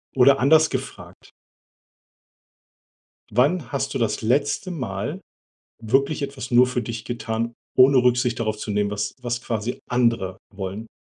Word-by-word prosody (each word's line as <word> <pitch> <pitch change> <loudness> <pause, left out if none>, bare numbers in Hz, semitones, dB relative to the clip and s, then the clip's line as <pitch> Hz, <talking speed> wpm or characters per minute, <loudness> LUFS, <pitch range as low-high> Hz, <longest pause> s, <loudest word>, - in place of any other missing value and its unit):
Oder 135 +1 +6
anders 155 +4 +5
gefragt - - -7 2.0
wann 130 - +1
hast 140 0 -2
du 135 - -1
das 115 -1 0
letzte 145 - 0
Mal 110 - -4 0.6
wirklich 135 +7 +1
etwas 135 -2 -5
nur 125 +1 +6
für 125 -1 -2
dich 115 -1 -6
getan, 115 0 -3 0.2
ohne 130 +1 +7
Rücksicht 125 -1 +2
darauf 110 -2 -1
zu 105 - -7
nehmen, 105 0 0
was 105 0 -3
was 120 0 -3
quasi 115 +1 -3
andere 115 -6 +1 0.2
wollen? 100 +3 -6
120 Hz, 135 wpm, -23 LUFS, 110-135 Hz, 2.0 s, ohne